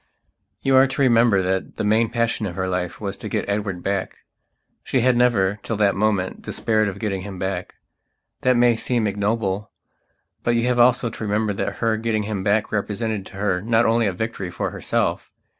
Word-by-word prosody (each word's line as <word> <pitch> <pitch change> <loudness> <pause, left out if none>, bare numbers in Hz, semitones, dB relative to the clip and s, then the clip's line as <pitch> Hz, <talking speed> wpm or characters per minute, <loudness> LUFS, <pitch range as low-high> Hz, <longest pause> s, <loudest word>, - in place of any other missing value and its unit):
You 135 -1 +3
are 135 +1 +6
to 135 +1 -3
remember 115 -6 +4
that 95 +1 -2
the - - -3
main 110 +2 +3
passion 115 -2 -1
of 85 - -6
her 95 +1 -2
life 90 -1 -3
was 100 -2 -4
to 110 - -7
get - - -2
Edward 100 -3 -2
back; 100 -1 -2 0.7
she 130 - 0
had 125 +1 +3
never, 105 -5 +2
till 115 - -3
that 100 -1 +3
moment, 100 -3 0
despaired 110 -1 0
of 100 -1 -4
getting 100 -2 -2
him 95 0 -7
back. 95 +1 -4 0.7
That 130 -1 +3
may 120 -1 +4
seem 115 0 0
ignoble; 105 0 -1 0.7
but 120 - +1
you 115 - +1
have 125 0 +1
also 120 -1 +4
to 110 - -7
remember 105 0 0
that - - -2
her 115 -1 0
getting 110 -1 -1
him 100 -2 -3
back 105 +2 +1
represented 105 -1 -2
to - - -15
her 95 -3 0
not 115 +2 +2
only 115 -1 +3
a - - +1
victory 95 -1 -4
for - - -3
herself. - - -1
110 Hz, 195 wpm, -22 LUFS, 100-115 Hz, 0.7 s, are